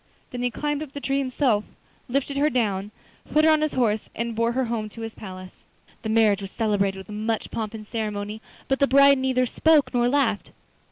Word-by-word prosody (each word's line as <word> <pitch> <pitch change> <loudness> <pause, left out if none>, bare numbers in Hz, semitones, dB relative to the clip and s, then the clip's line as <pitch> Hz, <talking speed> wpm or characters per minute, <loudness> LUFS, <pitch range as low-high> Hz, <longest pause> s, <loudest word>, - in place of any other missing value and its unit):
Then 245 -2 -5
he 245 - +1
climbed 295 +4 -2
up 295 -3 -7
the 285 - -5
tree 275 0 0
himself, 255 -5 +1 0.5
lifted 275 +2 -1
her 290 +2 +3
down, 205 -6 -1 0.4
put 305 +1 +4
her 320 - +6
on 310 -1 +3
his 310 -1 0
horse 220 -4 0
and 235 0 -2
bore 230 +1 +1
her 260 +1 0
home 225 -2 -3
to 230 - -10
his 225 0 -5
palace. 185 -2 -10 0.4
The 220 - -4
marriage 215 -2 +3
was 195 - -6
celebrated 200 -3 0
with 190 +2 -10
much 215 +1 -3
pomp 220 -1 -4
and 215 -1 -8
ceremony, 210 -1 -4 0.3
but 270 - +1
the 280 - +4
bride 280 0 +6
neither 260 -1 +1
spoke 305 +3 +3
nor 240 0 +2
laughed. 245 -7 +1
235 Hz, 210 wpm, -24 LUFS, 215-275 Hz, 0.5 s, her